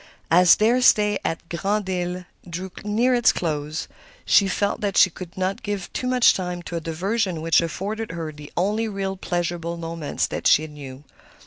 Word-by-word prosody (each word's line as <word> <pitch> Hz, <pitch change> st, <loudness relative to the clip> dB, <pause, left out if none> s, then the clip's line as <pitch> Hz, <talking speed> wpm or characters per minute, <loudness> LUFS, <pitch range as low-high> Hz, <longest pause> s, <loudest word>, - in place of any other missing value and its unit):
As 180 Hz, +1 st, +7 dB
their 235 Hz, +4 st, +3 dB
stay 210 Hz, -4 st, +4 dB
at 165 Hz, +1 st, -3 dB
Grand 200 Hz, +4 st, -1 dB
Isle 180 Hz, -1 st, -3 dB, 0.2 s
drew 180 Hz, +2 st, -5 dB
near 225 Hz, +5 st, +2 dB
its 240 Hz, -2 st, +4 dB
close, 155 Hz, -1 st, -3 dB, 0.4 s
she 200 Hz, -, +5 dB
felt 200 Hz, +1 st, -1 dB
that 200 Hz, -2 st, -1 dB
she 185 Hz, -, +6 dB
could 180 Hz, +1 st, -10 dB
not 185 Hz, +1 st, -1 dB
give 205 Hz, -3 st, -4 dB
too 250 Hz, -, -2 dB
much 250 Hz, -1 st, +5 dB
time 180 Hz, -1 st, -4 dB
to 170 Hz, -, -6 dB
a 165 Hz, -, -2 dB
diversion 185 Hz, +3 st, -1 dB
which 165 Hz, +1 st, +3 dB
afforded 200 Hz, +5 st, -4 dB
her 165 Hz, -2 st, -4 dB
the 150 Hz, -1 st, -12 dB
only 210 Hz, +5 st, +1 dB
real 195 Hz, -2 st, -3 dB
pleasurable 175 Hz, -2 st, -3 dB
moments 165 Hz, -2 st, -3 dB
that -, -, -2 dB
she 155 Hz, -, +5 dB
knew. 145 Hz, -3 st, -10 dB
180 Hz, 180 wpm, -23 LUFS, 165-205 Hz, 0.4 s, As